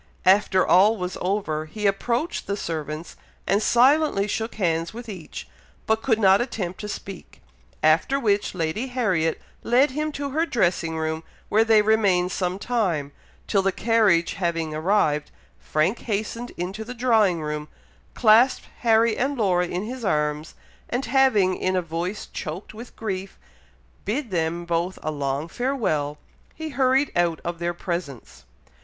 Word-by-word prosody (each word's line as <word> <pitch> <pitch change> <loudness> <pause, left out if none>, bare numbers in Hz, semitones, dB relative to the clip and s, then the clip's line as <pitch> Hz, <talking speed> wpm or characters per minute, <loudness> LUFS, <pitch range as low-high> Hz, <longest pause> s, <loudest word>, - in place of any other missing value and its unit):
After 190 0 +4
all 210 +5 +5
was 180 -1 -4
over, 180 -5 -1
he 210 +7 -6
approached 235 - 0
the 200 - -2
servants, 155 -2 -5 0.3
and 200 +3 +2
silently 255 -3 +3
shook 225 +2 -3
hands 165 -2 -1
with 240 0 -8
each, 185 -7 -8 0.4
but 220 0 +1
could 225 -3 +2
not 195 -1 +5
attempt 190 -7 -4
to 210 - -5
speak; 190 - -8 0.4
after 160 - +3
which 205 -5 0
Lady 170 +9 -2
Harriet 190 -11 0 0.2
led 255 +5 +3
him 305 +3 -2
to 280 -1 -4
her 315 +4 +1
dressing 175 - 0
room, 160 0 -2 0.3
where 220 +2 +4
they 220 -2 +5
remained 200 -5 +2
some 180 0 -2
time, 190 -11 -1 0.3
till, 200 - +2
the 195 0 +1
carriage 205 -6 +2
having 165 -4 -2
arrived, 155 -3 +1 0.3
Frank 155 +9 0
hastened 225 +2 -3
into 190 +5 -4
the 245 +3 -8
drawing 220 -8 +3
room, 150 -1 -4 0.5
clasped 230 +3 +4
Harry 225 -1 +3
and 275 +2 -1
Laura 180 -5 +2
in 180 +2 -3
his 245 +3 -6
arms, 150 -4 -1 0.3
and 250 +3 -1
having, 235 -9 +3
in 185 0 -1
a 185 - +2
voice 170 +5 -4
choked 160 +8 -6
with 230 +3 -11
grief, 195 -3 -5 0.7
bid 240 +2 -3
them 170 0 -1
both 170 +2 -1
a 155 - -1
long 140 +1 -2
farewell, 170 - -1 0.4
he 315 0 -5
hurried 270 0 +2
out 170 -2 +1
of 170 0 -4
their 175 0 -2
presence. 140 - -6
195 Hz, 150 wpm, -24 LUFS, 165-230 Hz, 0.7 s, all